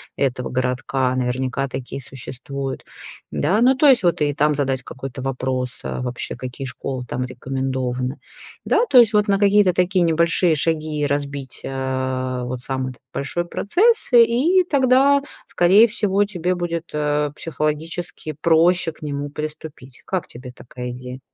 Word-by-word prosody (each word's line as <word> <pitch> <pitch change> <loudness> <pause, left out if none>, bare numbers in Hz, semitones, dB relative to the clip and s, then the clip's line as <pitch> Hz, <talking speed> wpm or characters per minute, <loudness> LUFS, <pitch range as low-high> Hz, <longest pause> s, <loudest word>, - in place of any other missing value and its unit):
этого 130 -2 -1
городка, 130 0 -1
наверняка 130 +2 -1
такие 130 +1 -6
существуют. 135 +1 -6 0.5
Да, 190 +10 +1
ну, 260 +2 +5
то 295 - +3
есть, 260 -3 +6
вот 175 -3 +2
и 145 -1 +2
там 150 +1 +2
задать 135 -2 -1
какой-то 135 0 -8
вопрос, 130 -1 -3
а - - -4
вообще, 125 -1 -4
какие 130 +1 -6
школы 130 0 -5
там 125 +2 -2
рекомендованы. 130 0 -3 0.5
Да, 465 +3 +3
то 255 - +5
есть 230 -2 +7
вот 210 0 +3
на 195 -1 +3
какие-то 200 -2 +4
такие 180 +1 +2
небольшие 165 +1 +2
шаги 155 -1 -1
разбить, 140 -2 -3
а, 130 -1 -2
вот 125 0 -5
сам 130 0 -3
этот 125 -2 -9
большой 175 +5 -2
процесс, 415 - +1
и 245 +11 +5
и - - 0
тогда, 280 -2 +4 0.2
скорее 190 +6 +5
всего, 205 -2 +1
тебе 180 -3 -2
будет, 175 -1 -3 0.2
а, 150 -1 0
психологически 160 +1 -3
проще 170 +1 +3
к - - -23
нему 145 -1 -4
приступить. 150 -3 -8
Как 185 -4 -2
тебе 125 +1 -10
такая 125 -1 -8
идея? 125 +1 -8
145 Hz, 150 wpm, -21 LUFS, 130-180 Hz, 0.5 s, есть